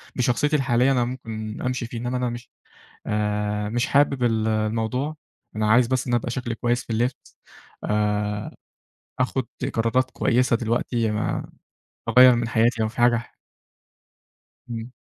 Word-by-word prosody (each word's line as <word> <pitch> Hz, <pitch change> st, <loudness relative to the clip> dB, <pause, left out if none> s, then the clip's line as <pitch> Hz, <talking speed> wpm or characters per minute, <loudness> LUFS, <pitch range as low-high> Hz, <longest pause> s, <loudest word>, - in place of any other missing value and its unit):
بشخصيتي 130 Hz, +5 st, +1 dB
الحالية 130 Hz, -1 st, +3 dB
أنا 125 Hz, -2 st, +2 dB
ممكن 110 Hz, -3 st, -6 dB
أمشي 125 Hz, -1 st, -2 dB
فيه، 120 Hz, -, -7 dB
إنما 125 Hz, +2 st, -2 dB
أنا 125 Hz, -1 st, -1 dB
مش 120 Hz, 0 st, -8 dB, 0.6 s
آآ 105 Hz, 0 st, -1 dB
مش 120 Hz, +2 st, 0 dB
حابب 140 Hz, -2 st, +2 dB
ال 110 Hz, -2 st, +1 dB
الموضوع 110 Hz, +7 st, -1 dB, 0.4 s
أنا 110 Hz, 0 st, +1 dB
عايز 120 Hz, 0 st, +5 dB
بس 130 Hz, 0 st, -1 dB
إن 120 Hz, -, -1 dB
أبقى 120 Hz, 0 st, 0 dB
شكلي 120 Hz, -2 st, -3 dB
كويس 120 Hz, +1 st, 0 dB
في -, -, -29 dB
اللبس، 120 Hz, +3 st, -2 dB, 0.5 s
آآ 105 Hz, 0 st, -1 dB, 0.6 s
أخد 130 Hz, 0 st, 0 dB, 0.3 s
قرارات 115 Hz, +3 st, +1 dB
كويسة 125 Hz, 0 st, +2 dB
دلوقتي، 115 Hz, 0 st, 0 dB
آآ، 105 Hz, 0 st, -2 dB, 0.6 s
أغير 125 Hz, 0 st, +8 dB
من 115 Hz, -1 st, -1 dB
حياتي 115 Hz, 0 st, +2 dB
لو 110 Hz, -, +1 dB
في 110 Hz, -, -13 dB
حاجة 120 Hz, 0 st, +5 dB
ح 115 Hz, -, -7 dB, 1.4 s
إمم. 115 Hz, +1 st, -6 dB
120 Hz, 145 wpm, -24 LUFS, 110-125 Hz, 1.4 s, أغير